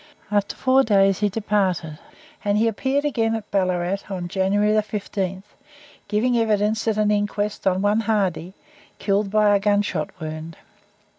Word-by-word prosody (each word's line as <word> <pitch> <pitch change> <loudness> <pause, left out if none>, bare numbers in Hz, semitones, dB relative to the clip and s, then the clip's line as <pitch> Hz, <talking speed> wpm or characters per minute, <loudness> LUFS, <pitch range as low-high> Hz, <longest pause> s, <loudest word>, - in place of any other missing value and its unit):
After 205 -1 0
four 265 0 +3
days 195 -4 +3
he 210 -1 +2
departed, 190 -7 -1 0.4
and 205 0 +1
he 225 +2 +3
appeared 265 +6 0
again 225 -6 0
at 220 -2 -7
Ballarat 185 -1 0
on 180 -3 -4
January 200 +3 +1
15th, 200 -3 -2 0.6
giving 220 +4 +1
evidence 215 0 +1
at 220 -1 +1
an 210 0 +2
inquest 205 0 -1
on 190 +1 +1
one 205 +2 +2
Hardy, 195 -5 -1 0.4
killed 200 0 0
by 210 0 +4
a - - +3
gunshot 205 -5 0
wound. 155 +1 -7
205 Hz, 145 wpm, -22 LUFS, 190-215 Hz, 0.6 s, by